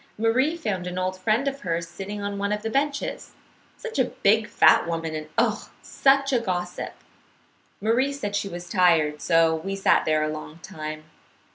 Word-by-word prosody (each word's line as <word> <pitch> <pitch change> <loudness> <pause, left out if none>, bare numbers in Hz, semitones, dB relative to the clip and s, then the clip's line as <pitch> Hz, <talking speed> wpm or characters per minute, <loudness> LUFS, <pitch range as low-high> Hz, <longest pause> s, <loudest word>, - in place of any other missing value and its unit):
Marie 255 +9 +2
found 195 - -3
an 180 0 -5
old 185 0 -1
friend 215 +8 0
of 275 0 -2
hers 170 -5 -2
sitting 200 +4 -6
on 200 0 -3
one 200 +1 -1
of 210 0 -2
the 225 - -3
benches, 280 +2 -2 0.4
such 455 - -5
a 255 - +4
big 220 -2 +2
fat - - +5
woman, 165 -1 -3
and 155 0 -6
oh, - - +1
such 275 0 +2
a 250 - +4
gossip! 180 -5 -3 0.9
Marie 235 +6 +1
said 210 -8 -4
she 205 -1 -1
was 175 -1 -7
tired, 165 -6 +3
so 165 -1 +3
we 195 +5 -4
sat 195 - +3
there 155 -1 +2
a - - 0
long 155 +1 -8
time. 155 0 -7
195 Hz, 180 wpm, -25 LUFS, 170-230 Hz, 0.9 s, fat